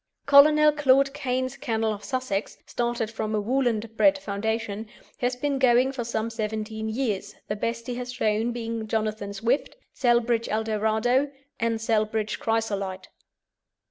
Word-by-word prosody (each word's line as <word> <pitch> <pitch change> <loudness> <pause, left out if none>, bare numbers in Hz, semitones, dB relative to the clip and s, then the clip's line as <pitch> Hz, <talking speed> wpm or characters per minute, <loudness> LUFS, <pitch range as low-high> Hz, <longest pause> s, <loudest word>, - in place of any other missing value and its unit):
Colonel 300 +2 +7
Claude 275 -2 +3
Cane's 260 -2 -2
kennel 225 -4 -1
of 205 - -9
Sussex, 255 -6 -3
started 235 -2 -2
from 215 -1 -2
a - - +1
"Woolland 230 -1 0
bred" 290 -1 +5
foundation, 220 -2 -3 0.3
has 245 0 0
been 280 +1 -1
going 255 0 +4
for 260 -3 -4
some 230 -1 -2
seventeen 220 0 -3
years, 215 -4 -2
the 210 - -2
best 230 +2 -3
he 250 - -3
has 250 0 -5
shown 225 -1 0
being 230 -2 -4
Jonathan 215 -2 -2
Swift, 230 +7 -1 0.2
Celbridge 240 -2 +2
Eldorado, 220 +5 +1 0.3
and 230 -1 0
Celbridge 215 -1 0
Chrysolite. 200 -4 -2
230 Hz, 140 wpm, -26 LUFS, 215-255 Hz, 0.3 s, Colonel